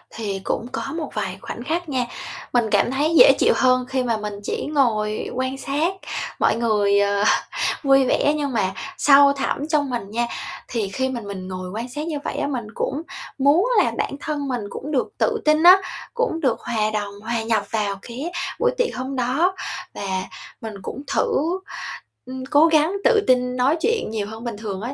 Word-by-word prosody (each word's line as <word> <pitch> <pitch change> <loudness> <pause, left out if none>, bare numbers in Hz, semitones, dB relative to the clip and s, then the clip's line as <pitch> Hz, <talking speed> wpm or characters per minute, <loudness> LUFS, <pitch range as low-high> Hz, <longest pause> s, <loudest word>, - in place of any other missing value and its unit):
Thì 200 -4 -3
cũng 235 - -2
có - - -3 0.2
một 310 -4 -3
vài 190 -4 -3
khoảnh 240 - -6
khắc 325 +4 -2
nha. 255 -3 0 0.5
Mình 240 -3 +2
cảm 205 +4 +3
thấy 295 +5 +1
dễ - - +9
chịu - - +5
hơn 255 -1 +3
khi 260 -1 0
mà 230 -3 0
mình 210 -1 -5
chỉ - - -3
ngồi 225 -8 0
quan 260 +1 -2
sát 295 +7 0 0.5
mọi - - +3
người, 210 -3 +2
ờ, 200 0 +2 0.6
vui 270 -1 +5
vẻ, 290 +3 +2
nhưng 285 -3 -2
mà 190 -5 +1 0.3
sâu 280 0 +6
thẳm 275 +1 -2
trong 290 -3 +1
mình 235 -6 -4
nha 235 +2 0 0.4
thì 220 -5 -2
khi 260 +6 -1
mà 245 -2 -4
mình 195 -3 -7
ngồi 185 -1 -5
quan 230 +5 -5
sát 295 +5 -5
như 310 -3 -2
vậy - - -3
á, - - 0
mình 245 -6 -3
cũng 290 +4 -2 0.4
muốn 290 - +4 0.2
là - - 0
bản - - -1
thân 290 -3 -3
mình 245 -3 -2
cũng 290 +8 -6
được 265 -4 0
tự 450 -3 +1
tin 305 +1 +4
á, 360 +2 +10 0.4
cũng 475 -8 0
được 260 -6 +1
hòa 215 -2 0
đồng, 205 -1 -2
hòa 230 0 -1
nhập 225 -1 +1
vào 205 -3 -1
cái 260 - -6 0.3
buổi 480 +1 +3
tiệc - - 0
hôm 260 +2 -4
đó. 270 +10 +1 0.4
Và 190 -2 -3 0.4
mình 220 -1 -6
cũng 275 +8 -6
thử, 335 +6 +1 0.7
ừm, 260 +1 -6
cố 295 +2 +6
gắng 315 +2 +3
tự - - +5
tin 250 -1 +3
nói 270 +6 +3
chuyện 460 +2 +1
nhiều 210 -2 -2
hơn 220 +2 -9
bình 235 -4 -4
thường 205 -3 -5
á. 240 +5 -4
255 Hz, 200 wpm, -22 LUFS, 220-295 Hz, 0.7 s, á